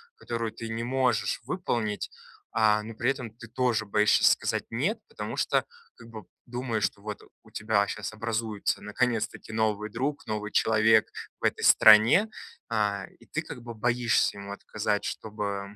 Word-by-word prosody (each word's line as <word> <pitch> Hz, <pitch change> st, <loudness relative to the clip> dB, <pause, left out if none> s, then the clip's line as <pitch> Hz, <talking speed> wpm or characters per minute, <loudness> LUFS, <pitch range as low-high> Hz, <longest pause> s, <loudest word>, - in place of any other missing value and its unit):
которую 115 Hz, -, -4 dB
ты 115 Hz, -, -7 dB
не 115 Hz, +1 st, -3 dB
можешь 125 Hz, -1 st, 0 dB
выполнить, 120 Hz, -, -2 dB, 0.4 s
а, 105 Hz, -1 st, +3 dB
но 115 Hz, +1 st, -8 dB
при 125 Hz, +3 st, +1 dB
этом 125 Hz, -4 st, -5 dB
ты 115 Hz, +1 st, -13 dB
тоже 120 Hz, -1 st, 0 dB
боишься 105 Hz, +1 st, +3 dB
сказать -, -, +2 dB
"нет", 155 Hz, -, 0 dB
потому 460 Hz, -, -6 dB
что -, -, +2 dB, 0.3 s
как 115 Hz, -, -14 dB
бы 110 Hz, -2 st, -9 dB, 0.2 s
думаешь, 120 Hz, -3 st, -3 dB
что 100 Hz, -, -4 dB
вот 105 Hz, 0 st, -6 dB, 0.2 s
у -, -, -19 dB
тебя 105 Hz, -1 st, +1 dB
щас -, -, -5 dB
образуется 110 Hz, -1 st, -2 dB
наконец-таки 110 Hz, 0 st, -2 dB
новый 110 Hz, -1 st, 0 dB
друг, 140 Hz, +6 st, -3 dB
новый 105 Hz, -1 st, -3 dB
человек 110 Hz, 0 st, +4 dB, 0.3 s
в -, -, -2 dB
этой -, -, 0 dB
стране, 110 Hz, -, +7 dB, 0.4 s
а, 105 Hz, -3 st, 0 dB
и -, -, -18 dB
ты -, -, -2 dB
как 125 Hz, -, -9 dB
бы 120 Hz, -1 st, -8 dB
боишься 115 Hz, -2 st, +1 dB
ему 100 Hz, 0 st, -7 dB
отказать, 105 Hz, 0 st, -2 dB
чтобы 100 Hz, -2 st, -4 dB
110 Hz, 160 wpm, -28 LUFS, 105-120 Hz, 0.4 s, стране